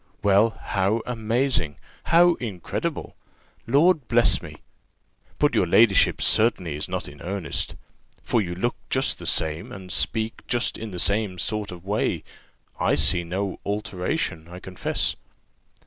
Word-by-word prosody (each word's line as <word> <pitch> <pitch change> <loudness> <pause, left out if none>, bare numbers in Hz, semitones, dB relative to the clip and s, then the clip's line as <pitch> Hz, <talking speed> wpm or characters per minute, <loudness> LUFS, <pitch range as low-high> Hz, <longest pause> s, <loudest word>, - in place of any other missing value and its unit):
"Well, 105 +3 +4
how 100 +3 0
amazing! 115 - 0 0.3
how 175 +1 +5
incredible! 100 -8 -4 0.5
Lord 150 +3 +3
bless 120 0 +3
me! - - -9 0.8
But - - +2
your 90 - +2
ladyship 100 +1 +4
certainly 95 -9 +2
is 75 - -4
not - - -3
in 70 0 -12
earnest? 90 -4 -2 0.5
for 115 - +1
you 90 -3 -4
look 120 +7 -1
just - - +1
the - - -6
same, 80 +1 0
and 95 -2 -9
speak 110 0 0
just 120 -1 0
in 115 - -6
the 90 -3 -6
same 100 -2 0
sort 105 +1 -1
of 90 0 -10
way: 105 +2 -1 0.6
I - - +2
see 85 +5 +3
no 95 +3 -3
alteration, 95 - -2
I 90 +1 -10
confess." 90 -1 -1
100 Hz, 140 wpm, -24 LUFS, 90-115 Hz, 0.8 s, how